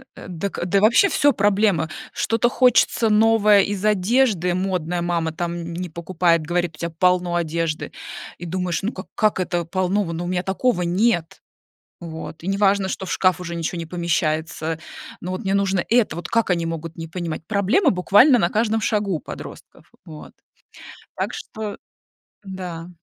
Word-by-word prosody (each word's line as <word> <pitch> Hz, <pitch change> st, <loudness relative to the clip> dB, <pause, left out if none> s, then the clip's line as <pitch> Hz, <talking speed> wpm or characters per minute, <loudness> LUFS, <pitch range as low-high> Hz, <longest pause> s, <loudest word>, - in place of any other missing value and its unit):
Э, -, -, -10 dB
дак 180 Hz, +3 st, -4 dB
да, 195 Hz, +2 st, +2 dB
вообще 240 Hz, -, +5 dB
всё 290 Hz, -1 st, +3 dB
проблема. 200 Hz, -5 st, +2 dB, 0.2 s
Что-то 230 Hz, +1 st, +1 dB
хочется 245 Hz, -3 st, +3 dB
новое 210 Hz, -1 st, +5 dB
из 200 Hz, 0 st, -2 dB
одежды, 205 Hz, -3 st, +2 dB
модное, 180 Hz, -2 st, -1 dB
мама 170 Hz, -2 st, -1 dB
там 170 Hz, +1 st, -3 dB
н 170 Hz, 0 st, -6 dB
не 180 Hz, 0 st, -4 dB
покупает, 170 Hz, 0 st, +1 dB
говорит: 175 Hz, 0 st, -1 dB
"У -, -, -19 dB
тебя 170 Hz, -1 st, -3 dB
полно 180 Hz, -1 st, +2 dB
одежды!" 165 Hz, -1 st, -2 dB, 0.5 s
И 175 Hz, -, -8 dB
думаешь: 180 Hz, +1 st, -2 dB
"Ну, 220 Hz, -, -1 dB
как -, -, -8 dB
как 215 Hz, -3 st, +2 dB
это 175 Hz, -2 st, -1 dB
полно? 185 Hz, +3 st, 0 dB
В 170 Hz, -2 st, -5 dB
ну, 170 Hz, +2 st, -4 dB
у -, -, -4 dB
меня 180 Hz, 0 st, -1 dB
такого 195 Hz, 0 st, 0 dB
нет". 175 Hz, 0 st, 0 dB, 0.6 s
Вот, 160 Hz, -1 st, -8 dB
и 185 Hz, -, -5 dB
не 195 Hz, 0 st, 0 dB
важно, 200 Hz, -1 st, +3 dB
что 190 Hz, -, -4 dB
в -, -, -3 dB
шкаф 185 Hz, -2 st, +2 dB
уже 170 Hz, -1 st, -5 dB
ничего 170 Hz, +1 st, -3 dB
не 165 Hz, -, -5 dB
помещается. 160 Hz, -2 st, -1 dB, 0.4 s
Ну, 180 Hz, -, -5 dB
вот 185 Hz, -, -4 dB
мне 195 Hz, 0 st, 0 dB
нужно 195 Hz, -2 st, +1 dB
это. 225 Hz, -8 st, +2 dB
Вот 170 Hz, -, -6 dB
как 230 Hz, -3 st, +1 dB
они 170 Hz, -2 st, +1 dB
могут 165 Hz, 0 st, -5 dB
не 165 Hz, 0 st, -6 dB
понимать. 165 Hz, -2 st, -5 dB
Проблема 220 Hz, -, +2 dB
буквально 205 Hz, +8 st, +5 dB
на 170 Hz, -, +2 dB
каждом 220 Hz, 0 st, +1 dB
шагу 210 Hz, -3 st, 0 dB
у 155 Hz, -, -3 dB
подростков. -, -, -11 dB
Вот. 75 Hz, -2 st, -11 dB, 0.8 s
Так -, -, -3 dB
что, 215 Hz, -2 st, -6 dB, 0.7 s
да. 180 Hz, -4 st, -7 dB
180 Hz, 175 wpm, -22 LUFS, 170-205 Hz, 0.8 s, вообще